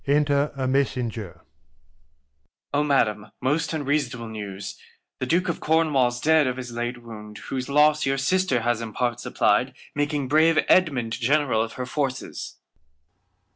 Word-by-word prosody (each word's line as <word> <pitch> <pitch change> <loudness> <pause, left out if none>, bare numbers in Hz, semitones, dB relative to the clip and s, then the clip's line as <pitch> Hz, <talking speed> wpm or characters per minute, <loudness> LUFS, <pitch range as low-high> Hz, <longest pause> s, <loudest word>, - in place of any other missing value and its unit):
Enter 145 0 +2
a 130 -1 -2
Messenger. 125 -8 -1
Mess. 70 -1 -41 0.3
O 145 +1 +2
Madam, 110 -7 +1
most 145 +5 0
unseasonable 140 -6 -1
News, 100 -2 -6 0.4
The 130 - -2
Duke 175 +6 +2
of 170 - -2
Cornwall's 145 -6 +2
dead 155 0 +4
of 125 0 -2
his 125 -2 -6
late 120 +1 -4
Wound, 105 -2 -10
Whose 130 -1 -5
Loss 150 +1 +4
your 135 0 +1
Sister 175 -1 +1
has 120 0 0
in 110 -2 -6
Part 120 0 -1
supply'd. - - +1 0.2
Making 145 -1 -1
brave 155 +3 +4
Edmund 135 -11 +3
General 130 -1 +2
of 115 0 -3
her 125 - -4
Forces. 135 0 -4
130 Hz, 145 wpm, -24 LUFS, 115-145 Hz, 0.4 s, dead